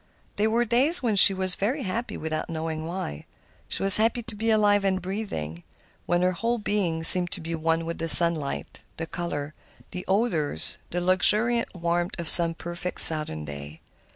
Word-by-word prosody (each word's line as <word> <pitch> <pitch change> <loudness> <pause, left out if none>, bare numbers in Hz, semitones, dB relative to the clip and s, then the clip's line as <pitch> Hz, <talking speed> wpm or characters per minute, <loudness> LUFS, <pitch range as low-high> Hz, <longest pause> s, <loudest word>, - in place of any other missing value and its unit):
There 215 +2 -1
were 235 +2 -2
days 265 +8 +2
when 225 -4 -2
she 195 - +7
was 190 -1 +3
very 255 +10 -5
happy 225 +5 -7
without 155 +1 -7
knowing 160 -1 -7
why. 165 - -9 0.4
She - - -5
was 195 0 +6
happy 230 +2 -2
to 230 -1 -11
be 225 +2 -5
alive 205 -2 0
and 190 -1 -2
breathing, 180 - -8 0.5
when 175 +1 -2
her 185 - 0
whole 230 +7 -4
being 195 -7 -5
seemed 175 +1 +9
to - - -9
be 165 +1 -9
one 165 0 -4
with 165 0 -8
the 165 0 -6
sunlight, 165 -5 +3 0.2
the 165 - -7
color, 155 -4 -8 0.4
the 180 0 -9
odors, 185 - -3
the 175 - -6
luxuriant 210 +6 0
warmth 175 +1 -5
of 170 - -5
some 165 -1 +4
perfect 175 +2 -8
Southern 150 - +6
day. 75 +1 -11
180 Hz, 180 wpm, -22 LUFS, 160-210 Hz, 0.5 s, seemed